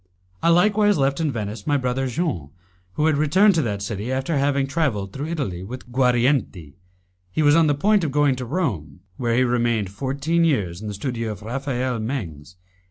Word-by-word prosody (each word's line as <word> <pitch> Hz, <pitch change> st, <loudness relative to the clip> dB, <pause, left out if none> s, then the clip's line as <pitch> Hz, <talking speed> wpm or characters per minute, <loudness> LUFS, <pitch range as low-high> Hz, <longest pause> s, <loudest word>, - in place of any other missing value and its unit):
I -, -, +3 dB
likewise 205 Hz, +4 st, +4 dB
left 135 Hz, +1 st, +1 dB
in 160 Hz, -3 st, 0 dB
Venice 105 Hz, -3 st, -5 dB
my 145 Hz, -, +3 dB
brother 130 Hz, 0 st, -1 dB
Jean, 125 Hz, -, -2 dB, 0.4 s
who 150 Hz, -, 0 dB
had 155 Hz, -2 st, +3 dB
returned 185 Hz, +8 st, +4 dB
to 165 Hz, -, +2 dB
that 100 Hz, -6 st, -3 dB
city 105 Hz, +4 st, -4 dB
after 135 Hz, +5 st, -1 dB
having 140 Hz, 0 st, +1 dB
travelled 135 Hz, -, -1 dB
through 140 Hz, +3 st, -4 dB
Italy 135 Hz, -, -3 dB
with 125 Hz, +4 st, -9 dB
Guarienti. 125 Hz, -, +1 dB, 0.6 s
He 155 Hz, -, 0 dB
was 145 Hz, 0 st, +5 dB
on 165 Hz, -1 st, +5 dB
the 145 Hz, -, +2 dB
point 205 Hz, +6 st, +2 dB
of 155 Hz, -, -1 dB
going 145 Hz, -1 st, +3 dB
to 125 Hz, -, -4 dB
Rome, 100 Hz, -, -3 dB, 0.2 s
where 120 Hz, -2 st, 0 dB
he 130 Hz, -, +4 dB
remained 120 Hz, -5 st, 0 dB
fourteen 140 Hz, +9 st, -1 dB
years 100 Hz, -, 0 dB
in 110 Hz, -, -6 dB
the 105 Hz, -, -4 dB
studio 115 Hz, +1 st, -3 dB
of 100 Hz, -, -12 dB
Raphael 125 Hz, 0 st, -2 dB
Mengs. 95 Hz, -, -5 dB
130 Hz, 190 wpm, -22 LUFS, 110-150 Hz, 0.6 s, was